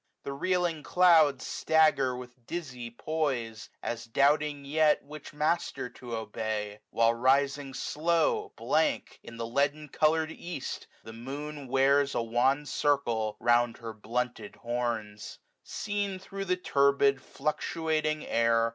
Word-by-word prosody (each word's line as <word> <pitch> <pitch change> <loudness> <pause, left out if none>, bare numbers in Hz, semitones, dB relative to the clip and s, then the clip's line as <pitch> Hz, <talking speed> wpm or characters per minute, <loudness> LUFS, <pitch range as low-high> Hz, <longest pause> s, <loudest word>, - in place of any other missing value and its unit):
The 140 - -4
reeling 175 +1 0
clouds 160 -6 +4
Stagger 155 -5 +2
with 125 -1 -12
dizzy 125 -9 -5
poise, 120 -4 -3
as 120 0 -4
doubting 145 +4 +2
yet 155 +1 +3
Which 150 +1 -10
master 150 -4 -1
to 120 -2 -7
obey: 110 -1 -4
while 115 0 +3
rising 135 +2 +1
slow. 165 +1 0
Blank, - - 0
in 115 - -11
the 115 - -3
leaden 145 +5 0
colour'd 160 +2 +2
east, 170 -4 -6 0.2
the 110 - -10
moon 140 +4 -6
Wears 135 +2 +3
a - - +1
wan 130 +5 +2
circle 120 -8 0
round 120 0 +3
her 115 -2 -7
blunted 115 0 -3
horns, 115 -3 -4 0.3
12^ - - -17
Seen 205 -2 -2
thro' 195 +1 -6
the 180 -1 +1
turbid 140 -4 +3
fluctuating 155 +1 -2
air. 115 0 +2
140 Hz, 130 wpm, -29 LUFS, 120-155 Hz, 0.3 s, clouds